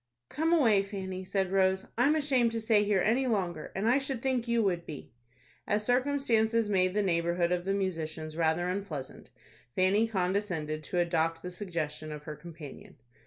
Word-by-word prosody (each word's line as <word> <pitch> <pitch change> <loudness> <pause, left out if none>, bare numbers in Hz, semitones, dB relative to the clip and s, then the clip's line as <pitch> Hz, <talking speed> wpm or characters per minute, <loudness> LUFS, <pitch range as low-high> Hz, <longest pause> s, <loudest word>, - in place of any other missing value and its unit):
"Come 320 +4 0
away, 235 -12 +5
Fanny," 190 -2 -5
said 190 0 -1
Rose; 190 0 +2
"I'm 275 +6 +3
ashamed 260 -6 +2
to 230 - -1
stay 220 -2 +3
here 205 -2 +2
any 245 +7 +2
longer, 180 -8 -2
and 195 +3 0
I 250 +4 +4
should 270 -2 -2
think 255 -3 0
you 235 -1 +2
would 175 -4 0
be." 150 -8 -9 0.6
As 210 +1 +1
circumstances 240 -4 +2
made 185 -1 +2
the 210 - +2
neighborhood 170 -1 +1
of 180 0 0
the 195 - +1
musicians 160 -5 -3
rather 165 +1 +1
unpleasant, 180 -8 -5 0.5
Fanny 200 +4 +3
condescended 180 -6 -1
to 180 - -3
adopt 165 -1 +1
the 180 - -5
suggestion 165 -5 -4
of 150 -1 -7
her 150 0 -6
companion. 160 -4 -11
190 Hz, 170 wpm, -30 LUFS, 170-225 Hz, 0.6 s, away